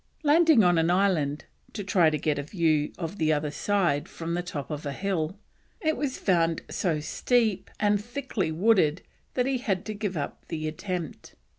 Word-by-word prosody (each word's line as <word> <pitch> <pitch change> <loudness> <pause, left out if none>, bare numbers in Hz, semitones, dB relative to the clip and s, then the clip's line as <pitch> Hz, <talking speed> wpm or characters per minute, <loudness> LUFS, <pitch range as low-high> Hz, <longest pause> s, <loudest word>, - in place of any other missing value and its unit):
Landing 310 -4 +5
on 175 -2 +4
an 165 +1 +2
island 175 -6 +1 0.3
to 205 - -4
try 180 -4 +4
to 155 - -1
get 150 0 0
a - - 0
view 155 -2 +1
of 170 +3 -5
the 155 -1 +2
other 150 -1 0
side 170 -4 0
from 165 0 -5
the 175 - 0
top 160 -5 -6
of 150 0 -4
a 140 -2 -3
hill, 185 +1 -2 0.4
it 315 -6 +1
was 280 -3 -2
found 170 -4 +1
so 165 -5 0
steep 220 +4 0
and 205 -1 +2
thickly 240 - -3
wooded 180 -2 +3 0.3
he 255 +1 +1
had 195 -8 -1
to 215 - -4
give 205 -4 -3
up 140 - -5
the 155 -1 -3
attempt. 175 0 -5
180 Hz, 180 wpm, -27 LUFS, 155-210 Hz, 0.4 s, Landing